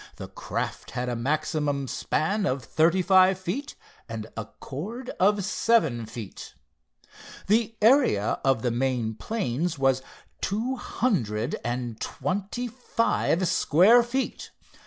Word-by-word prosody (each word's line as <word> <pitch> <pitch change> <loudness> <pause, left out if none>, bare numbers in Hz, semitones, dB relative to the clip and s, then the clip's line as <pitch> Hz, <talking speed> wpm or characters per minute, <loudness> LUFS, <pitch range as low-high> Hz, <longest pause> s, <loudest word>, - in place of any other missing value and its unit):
The - - -8
craft - - -4
had 125 +1 -3
a 120 - -2
maximum 145 +2 -1
span 185 - 0
of 130 -1 -1
thirty 165 +8 +2
five 185 0 +5
feet 190 +11 -4 0.3
and 110 -1 -5
a 115 - -4
chord 210 - -7
of 200 0 +3
seven 160 - +1
feet. 110 -3 -9 0.9
The 225 +2 +2
area 225 - +4
of 135 -4 +2
the 120 - +1
main 120 -2 0
planes 165 - -2
was 135 -1 +2 0.4
two 225 +7 -1
hundred 125 - -1
and 120 -2 -3
twenty 205 +6 -3
five 230 -6 0
square 190 +13 +5
feet. 250 +3 -3
160 Hz, 120 wpm, -26 LUFS, -, 0.9 s, five